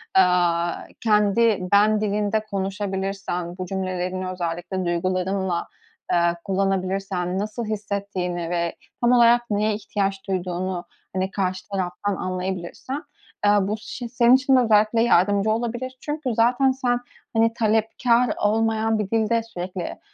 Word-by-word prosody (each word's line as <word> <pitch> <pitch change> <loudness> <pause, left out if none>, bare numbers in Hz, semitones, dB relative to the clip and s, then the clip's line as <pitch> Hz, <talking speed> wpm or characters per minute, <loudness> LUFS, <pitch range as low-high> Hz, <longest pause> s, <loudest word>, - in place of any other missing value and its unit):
aaa, 175 -2 +3 0.3
kendi 210 -2 +3
"ben" 210 +1 +4
dilinde 210 +1 +1
konuşabilirsen, 195 -3 -3
bu 185 - -4
cümlelerini 185 0 -3
özellikle 180 +1 -3
duygularınla, 185 +1 -1 0.4
eee, 175 - +4 0.2
kullanabilirsen, 190 -1 -1
nasıl 215 +3 -3
hissettiğini 200 -5 -3
ve 170 -1 -1 0.3
tam 240 0 +4
olarak 240 -1 +6
neye 210 +1 +1
ihtiyaç 200 -1 -2
duyduğunu, 185 -1 -2 0.3
hani, 190 +1 -1
karşı 185 -2 -2
taraftan 195 +1 -2
anlayabilirsen, 185 - -4 0.4
eee, 205 - +6
bu 200 +2 -1
ş 240 +3 -7
senin 240 +1 +5
için 270 0 +3
de - - +6
özellikle 220 -1 +3
yardımcı 205 -1 +3
olabilir. 240 +3 -3
Çünkü 295 -4 -3
zaten 245 +4 +4
sen, 250 -2 0 0.3
hani, 225 0 +3
talepkâr 230 +2 +2
olmayan 220 +1 +1
bir 205 -2 -2
dilde 225 0 +2
sürekli, 180 -4 -6
200 Hz, 120 wpm, -23 LUFS, 185-225 Hz, 0.4 s, olarak